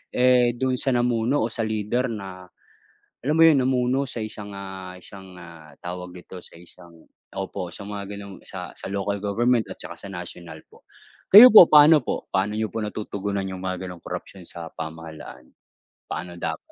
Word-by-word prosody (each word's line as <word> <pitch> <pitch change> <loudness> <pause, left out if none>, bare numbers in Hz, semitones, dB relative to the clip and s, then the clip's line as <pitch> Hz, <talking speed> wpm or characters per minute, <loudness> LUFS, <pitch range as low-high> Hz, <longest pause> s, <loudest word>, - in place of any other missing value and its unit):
eh, 125 -1 +4
dun 130 -1 +1
sa 135 - 0
namuno 120 +2 +1
o - - +1
sa 115 - -3
leader 110 +3 -1
na 95 -4 -8 0.8
alam 150 +4 0
mo 165 - +7
'yon, 160 -4 +6
namuno 130 +1 +1
sa 120 -3 -5
isang 105 -2 -8
ah 95 -2 -8
isang 95 0 -13
ah, 85 -3 -13
tawag 90 0 -7
dito, 90 +1 -11
sa - - -16
isang, 85 -1 -17 0.3
opo, - - -4
sa - - -10
mga 100 0 -7
ganong 100 -1 -10
sa - - -7 0.2
local 100 +1 -2
government 115 +4 +1
at - - -8
saka - - -8
sa - - -10
national 85 -3 -9
po. - - -21 0.4
Kayo 230 +6 +11
po, 180 -6 +11
paano 150 +1 +7
po, - - -4
paano 100 +3 0
niyo 110 -2 -2
po 115 - -4
natutugunan 100 -1 -4
yung 95 -1 -6
mga 95 0 -4
ganong 90 - -11
korapsiyon 95 -3 -8
sa 85 -1 -9
pamahalaan, 80 -4 -9 0.6
paano 90 -1 -6
dapat? - - -3
100 Hz, 175 wpm, -24 LUFS, 90-120 Hz, 0.8 s, Kayo